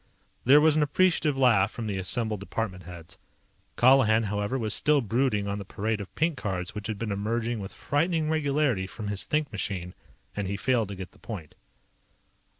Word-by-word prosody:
There 140 +4 +8
was 155 0 +4
an 155 - +3
appreciative 150 -1 +2
laugh 115 -7 +4
from 115 +1 -6
the 100 -3 -2
assembled 105 +3 -2
department 100 -3 -4
heads. 85 -1 -10 0.6
Colihan, 120 -3 +5
however, 105 +4 -1
was 110 -4 -1
still 150 -1 +3
brooding 115 -3 0
on 100 +1 -2
the - - -5
parade 105 +3 -2
of 100 - -10
pink 160 -1 +1
cards 95 -5 -3
which 105 -1 -5
had 110 -2 -3
been 110 0 -3
emerging 115 +3 -1
with 95 -1 -6
frightening 160 +2 0
regularity 145 -9 +1
from 105 +1 -6
his 100 -1 -3
think 150 -1 0
machine, 95 -4 -3 0.4
and 100 -2 -2
he 100 +1 -2
failed 120 -2 +1
to 100 - -6
get 95 -1 -8
the - - -23
point. 95 -10 -8
110 Hz, 185 wpm, -27 LUFS, 100-135 Hz, 0.6 s, There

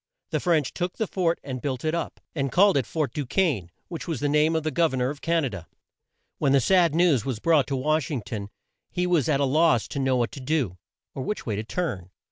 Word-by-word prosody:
The - - +1
French 160 -6 +1
took 175 0 -3
the 220 - 0
fort 175 -4 0
and 130 -3 -5
built 130 0 -3
it 155 - +1
up, 170 -1 -3
and 135 -4 -1
called 200 +1 +5
it 130 -5 +1
Fort 150 -7 -2
Du 150 - -2
quesne 125 - -14 0.4
(kane), - - -30 0.2
which 170 0 -7
was 160 -7 -2
the 145 - 0
name 150 +2 +3
of 160 - 0
the 155 - -1
Gov 165 +1 +2
er - - -3
nor 125 0 +1
of 145 - -10
Can 165 -2 +1
a - - -1
da. 95 -5 -7 0.8
When 135 - +2
the 140 - +6
sad 170 +1 +3
news 165 -9 +3
was 130 -3 -2
brought 155 +2 +3
to 140 - -1
Wash 155 +4 0
ing 135 -8 -3
ton 105 -1 -5 0.4
he 180 +1 -1
was 170 -7 +2
at 140 -2 +2
a 140 - +3
loss 150 -3 +3
to 140 - -4
know 130 -1 +2
what 120 -1 0
to - - -8
do, 130 - -1 0.3
or 135 - -5
which 210 +10 -3
way 110 - -1
to 105 - -3
turn. 110 - -3
145 Hz, 265 wpm, -25 LUFS, 130-165 Hz, 0.8 s, the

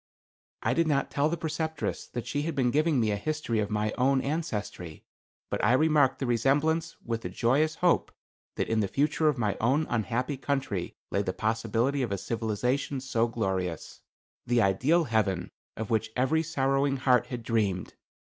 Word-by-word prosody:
I - - +2
did 165 -1 +2
not 140 -3 +1
tell 145 +2 +2
the 170 - -2
Preceptress 160 0 -3
that 120 -2 -5
she 145 +4 -2
had 160 +1 -3
been 125 -3 +2
giving 155 0 +2
me 110 -2 +2
a - - +1
history 120 0 -2
of 105 -1 -1
my 105 0 -1
own 135 +1 +3
ancestry; 105 - -4 0.5
but - - -1
I 115 - +4
remarked 145 -2 +4
the 135 - -2
resemblance 145 +7 +1
with 115 -1 -2
the 90 - -4
joyous 135 - +1
hope 175 0 +2 0.4
that - - -1
in 115 - +1
the 105 - +1
future 150 +7 +1
of 150 -3 +2
my 105 -4 0
own 135 +7 +2
unhappy 120 +4 -1
country 135 -9 -2 0.2
lay 100 - +1
the 95 -2 -2
possibility 115 +6 0
of 120 -5 -2
a 100 - 0
civilization 115 +7 -1
so 125 -3 0
glorious, 95 -7 -3 0.4
the 120 0 +1
ideal 130 - +3
heaven 105 - 0 0.3
of 110 0 -4
which 110 0 +1
every 135 +6 +2
sorrowing 135 -3 +1
heart 130 -1 +3
had 120 -3 -5
dreamed. 105 -6 -1
125 Hz, 175 wpm, -28 LUFS, 110-145 Hz, 0.5 s, I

